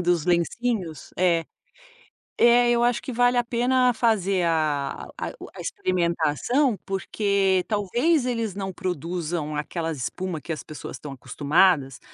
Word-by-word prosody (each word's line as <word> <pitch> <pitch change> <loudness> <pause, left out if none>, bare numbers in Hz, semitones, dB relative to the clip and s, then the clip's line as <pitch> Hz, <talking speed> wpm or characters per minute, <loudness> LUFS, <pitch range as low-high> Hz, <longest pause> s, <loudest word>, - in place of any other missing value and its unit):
dos 175 -3 +1
lencinhos, 180 0 -1
é. 170 -2 +2 1.0
É, 240 0 +6
eu 240 0 +3
acho 240 0 +2
que - - -6
vale 245 +1 +3
a 245 - +3
pena 250 +2 +2
fazer 200 -6 +2
a 155 -4 -1
a - - -4
o - - -9
a - - -10
experimentação, 185 - 0
porque 195 -1 +1
talvez 240 - +1
eles 230 -4 -1
não 195 0 -4
produzam 170 -3 -3
aquelas 160 +1 -3
espuma 175 +6 -4
que 165 - -5
as 155 - -6
pessoas 150 -3 -8
estão 145 +3 -8
acostumadas, 140 +1 +2
185 Hz, 140 wpm, -24 LUFS, 160-235 Hz, 1.0 s, É